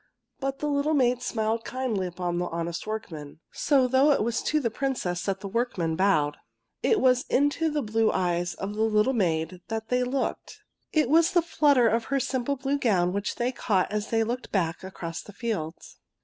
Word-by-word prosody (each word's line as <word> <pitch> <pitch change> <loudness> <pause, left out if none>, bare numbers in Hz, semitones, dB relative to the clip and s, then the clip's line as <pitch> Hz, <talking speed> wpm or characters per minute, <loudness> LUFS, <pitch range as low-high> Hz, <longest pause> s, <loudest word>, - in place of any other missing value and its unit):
But 270 0 -2
the 300 - -3
little 290 +2 +1
maid 250 -2 +2
smiled 225 -1 -1
kindly 245 -8 -2
upon 175 0 -3
the 175 - -1
honest 170 +2 -4
workmen. 160 -10 -6
So 270 -4 +2
though 260 +3 +4
it 280 - +3
was 235 +1 -1
to 305 - +1
the 235 -6 -1
Princess 220 -9 -2
that 195 -1 -1
the 200 - -5
workmen 195 -7 -1
bowed, 155 -6 +2 0.4
it 440 - +3
was 255 -4 +4
into 290 +4 +2
the 295 -2 -1
blue 220 0 +2
eyes 175 -1 -1
of 195 +4 -5
the 215 - -3
little 220 +3 +3
maid 175 -4 -1
that 225 0 -4
they 250 0 +2
looked. 260 +2 -3 0.3
It 305 -5 +2
was 330 +6 +4
the 345 -2 +4
flutter 285 -7 +3
of 225 +1 +1
her 275 0 0
simple 260 +1 -1
blue 275 +2 -1
gown 185 -8 +2
which 200 +1 -2
they 240 +1 0
caught 205 -7 0
as 210 0 -2
they 225 -1 +2
looked 240 +3 -4
back 170 -4 -1
across 170 -3 -6
the 205 - -13
fields. 190 -8 -5
225 Hz, 195 wpm, -27 LUFS, 185-265 Hz, 0.4 s, though